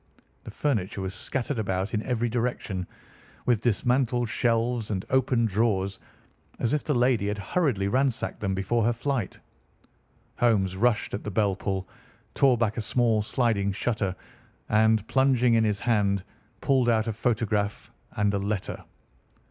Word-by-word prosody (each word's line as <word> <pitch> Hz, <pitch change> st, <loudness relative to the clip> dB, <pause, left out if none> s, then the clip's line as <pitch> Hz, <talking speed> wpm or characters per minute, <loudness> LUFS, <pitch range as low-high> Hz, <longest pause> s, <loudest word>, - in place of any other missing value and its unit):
The -, -, -7 dB
furniture 110 Hz, -10 st, -1 dB
was 95 Hz, 0 st, -3 dB
scattered 125 Hz, +6 st, -3 dB
about 95 Hz, 0 st, -2 dB
in 105 Hz, -, 0 dB
every 120 Hz, 0 st, -1 dB
direction, 115 Hz, -6 st, -2 dB, 0.6 s
with 120 Hz, -4 st, +2 dB
dismantled 120 Hz, +1 st, +1 dB
shelves 115 Hz, 0 st, 0 dB
and 95 Hz, -3 st, -2 dB
open 130 Hz, -2 st, +2 dB
drawers, 100 Hz, -2 st, 0 dB, 0.6 s
as 120 Hz, -, 0 dB
if 150 Hz, -, 0 dB
the 150 Hz, -, 0 dB
lady 120 Hz, -4 st, +2 dB
had 105 Hz, 0 st, -2 dB
hurriedly 105 Hz, -, 0 dB
ransacked 130 Hz, +2 st, 0 dB
them 95 Hz, -2 st, -1 dB
before 110 Hz, +5 st, 0 dB
her 120 Hz, +2 st, +2 dB
flight. 120 Hz, -3 st, -2 dB, 1.0 s
Holmes 100 Hz, -6 st, +2 dB
rushed 115 Hz, +2 st, +1 dB
at 100 Hz, -, -3 dB
the -, -, -4 dB
bell 100 Hz, -1 st, +1 dB
pull, 95 Hz, -1 st, -3 dB, 0.5 s
tore 135 Hz, -3 st, +4 dB
back 115 Hz, -1 st, 0 dB
a -, -, 0 dB
small 115 Hz, -1 st, +2 dB
sliding 105 Hz, -3 st, 0 dB
shutter, 100 Hz, -3 st, -1 dB, 0.5 s
and, 110 Hz, 0 st, +3 dB
plunging 125 Hz, -1 st, +3 dB
in 115 Hz, -1 st, +4 dB
his 105 Hz, -2 st, 0 dB
hand, 100 Hz, -5 st, +1 dB, 0.4 s
pulled 130 Hz, -3 st, +2 dB
out 110 Hz, -2 st, +2 dB
a 115 Hz, -, -2 dB
photograph 105 Hz, -2 st, -1 dB, 0.2 s
and 105 Hz, -1 st, +1 dB
a 100 Hz, -, 0 dB
letter. 100 Hz, 0 st, -3 dB
110 Hz, 150 wpm, -26 LUFS, 100-120 Hz, 1.0 s, tore